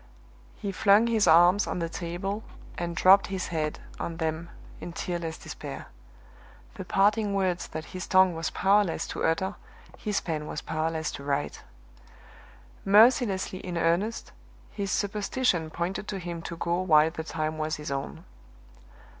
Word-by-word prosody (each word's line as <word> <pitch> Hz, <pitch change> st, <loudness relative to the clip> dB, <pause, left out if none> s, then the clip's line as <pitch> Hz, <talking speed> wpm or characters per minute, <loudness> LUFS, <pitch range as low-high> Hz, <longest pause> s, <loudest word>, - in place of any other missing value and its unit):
He 200 Hz, -2 st, -4 dB
flung 200 Hz, +3 st, +4 dB
his 225 Hz, -4 st, +2 dB
arms 175 Hz, +5 st, +6 dB
on -, -, -2 dB
the 170 Hz, -1 st, -1 dB
table 175 Hz, +5 st, -4 dB, 0.3 s
and 170 Hz, 0 st, -4 dB
dropped 195 Hz, +3 st, +6 dB
his 190 Hz, -1 st, -4 dB
head 155 Hz, -2 st, -2 dB, 0.2 s
on 165 Hz, -1 st, -4 dB
them 160 Hz, +1 st, -3 dB, 0.3 s
in 175 Hz, -, -7 dB
tearless 170 Hz, -2 st, -4 dB
despair. -, -, -8 dB, 0.8 s
The 190 Hz, -5 st, -7 dB
parting 205 Hz, +2 st, +2 dB
words 185 Hz, -2 st, 0 dB
that 160 Hz, 0 st, -6 dB
his 185 Hz, 0 st, -5 dB
tongue 185 Hz, -1 st, +5 dB
was 165 Hz, 0 st, -2 dB
powerless 200 Hz, -3 st, +2 dB
to -, -, -4 dB
utter 190 Hz, +5 st, +1 dB, 0.5 s
his 210 Hz, -2 st, -1 dB
pen 155 Hz, -3 st, -4 dB
was 150 Hz, -, -4 dB
powerless 160 Hz, 0 st, -2 dB
to 140 Hz, -, -8 dB
write. 140 Hz, -, -2 dB, 1.2 s
Mercilessly 205 Hz, -2 st, +4 dB
in 180 Hz, -2 st, -5 dB
earnest, 170 Hz, +7 st, 0 dB, 0.4 s
his 200 Hz, -2 st, -4 dB
superstition 205 Hz, -3 st, 0 dB
pointed 175 Hz, +5 st, -3 dB
to 200 Hz, -, -3 dB
him 170 Hz, -2 st, -5 dB
to 170 Hz, 0 st, -7 dB
go 170 Hz, +2 st, 0 dB
while 160 Hz, -3 st, +4 dB
the 160 Hz, -1 st, -5 dB
time 155 Hz, 0 st, -3 dB
was 155 Hz, 0 st, -1 dB
his 150 Hz, -2 st, -6 dB
own. 135 Hz, 0 st, -5 dB
175 Hz, 150 wpm, -27 LUFS, 160-195 Hz, 1.2 s, arms